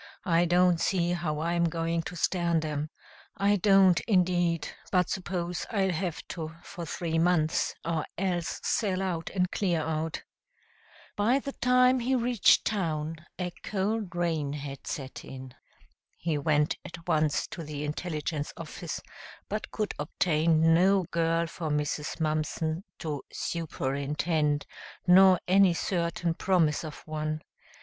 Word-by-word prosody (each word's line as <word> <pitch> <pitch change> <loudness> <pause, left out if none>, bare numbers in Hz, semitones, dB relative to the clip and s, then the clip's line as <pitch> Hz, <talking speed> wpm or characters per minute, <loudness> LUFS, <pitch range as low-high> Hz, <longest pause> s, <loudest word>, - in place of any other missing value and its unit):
I 170 -2 +3
don't 175 0 +4
see 175 -2 +1
how 155 -3 -2
I'm 170 +1 +1
going 165 0 0
to 180 - -9
stand 170 -1 +1
'em 150 0 -3 0.5
I 200 +1 +3
don't, 195 -2 +5
indeed, 175 -5 +2 0.2
but 180 -3 +2
suppose 180 -2 -3
I'll 195 -4 +1
have 175 -1 -3
to 160 -2 -5
for 170 -2 -7
three 165 0 -1
months, 165 -2 +2
or 165 -2 -1
else 175 -2 -1
sell 195 -4 0
out 170 -4 -2
and 180 -1 0
clear 175 -5 +1
out." 160 +1 -2 0.9
By 225 +6 +3
the 275 0 -4
time 250 0 +4
he 255 +2 +1
reached 240 -3 +4
town 165 -6 -1 0.2
a 180 -1 -2
cold 205 -1 -2
rain 160 -5 0
had 140 -2 -7
set 135 -2 -5
in. 130 -1 -9 0.6
He 165 -2 -1
went 150 +1 +1
at 165 0 -10
once 155 -1 +2
to - - -6
the 150 -1 -5
intelligence 150 -1 -3
office, - - -6 0.5
but 215 +1 -3
could 215 -1 -2
obtain 160 +1 +3
no 190 +3 +4
girl 165 0 +1
for 165 -1 -5
Mrs. 150 +1 -2
Mumpson 155 +2 -1
to 150 -4 -4
"superintend," 150 -1 -1 0.4
nor 185 0 +7
any 190 -1 +5
certain 170 -1 -1
promise 165 -4 +2
of 155 -2 -7
one. 155 0 -3
170 Hz, 135 wpm, -28 LUFS, 155-185 Hz, 0.9 s, nor